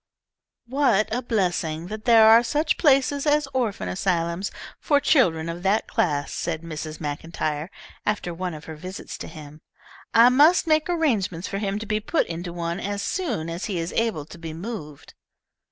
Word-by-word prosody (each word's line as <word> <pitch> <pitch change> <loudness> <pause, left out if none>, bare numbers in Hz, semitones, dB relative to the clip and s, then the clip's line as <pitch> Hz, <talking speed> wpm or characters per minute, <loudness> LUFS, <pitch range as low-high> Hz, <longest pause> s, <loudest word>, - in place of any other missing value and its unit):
"What 235 -5 +2
a 245 - 0
blessing 175 -8 -1
that 215 0 -7
there 225 -2 +7
are 225 +1 +8
such 295 +6 0
places 280 -1 +3
as 295 -1 +3
orphan 230 - -1
asylums 170 - -1 0.3
for 290 -3 +3
children 170 - +3
of 170 +1 -5
that 195 +3 +1
class," 145 -4 -1
said 165 -1 -3
Mrs. 155 -1 -6
Maclntyre, 155 +1 -3 0.3
after 210 -4 -1
one 180 -1 -4
of 150 0 -10
her 160 - -7
visits 185 +5 -8
to - - -6
him. 150 -1 -11 0.5
"I 235 +2 +7
must 300 +9 +5
make 310 0 +2
arrangements 220 - 0
for 195 - -3
him 200 -1 -1
to 220 - -5
be 215 0 0
put 270 +10 0
into 170 +1 -5
one 170 +1 -3
as 200 0 -3
soon 245 - -2
as 170 +2 -4
he 195 -4 -3
is 165 +1 -3
able 225 -10 0
to 170 - -12
be 165 -1 -6
moved." 165 -6 -8
195 Hz, 175 wpm, -24 LUFS, 165-240 Hz, 0.5 s, are